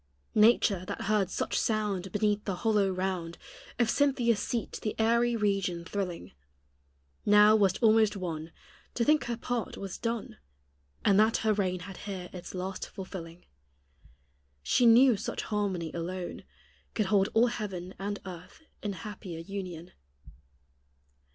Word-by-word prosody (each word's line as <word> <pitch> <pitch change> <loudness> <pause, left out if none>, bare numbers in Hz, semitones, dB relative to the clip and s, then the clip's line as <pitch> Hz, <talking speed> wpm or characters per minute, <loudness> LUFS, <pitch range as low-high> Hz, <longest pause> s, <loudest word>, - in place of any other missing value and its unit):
Nature, 210 -4 +4
that - - -5
heard 200 -2 +1
such - - -2
sound 205 -4 -1
Beneath 210 0 +1
the 195 - -1
hollow 210 -3 +3
round 185 -3 -3 0.4
Of 240 - +3
Cynthia's 250 -6 +2
seat 235 -2 -3
the 215 - -2
airy 235 +2 +3
region 195 -5 0
thrilling, 175 - -4 0.9
Now 210 +1 +7
was 195 -4 +3
almost 215 -2 +5
won 165 -3 -5 0.4
To 235 - +1
think 300 -4 +3
her 240 -1 -3
part 240 -3 -3
was 195 -2 -6
done. 230 -2 -3 0.7
And 200 0 +5
that 220 +2 +4
her 215 - +4
reign 185 -3 -1
had 190 0 -9
here 190 -3 -6
its 180 0 -8
last 185 +1 -4
fulfilling; 180 -3 -8 1.2
She 240 - +4
knew 240 0 +7
such - - -4
harmony 195 -6 -2
alone 175 +1 -5 0.5
Could 215 - +1
hold 195 0 +3
all 225 +2 +6
heaven 195 -6 -4
and 205 +1 -3
earth 180 - -10 0.2
in 205 -1 -3
happier 205 -4 -7
union. 180 -2 -7
200 Hz, 140 wpm, -29 LUFS, 185-220 Hz, 1.2 s, Now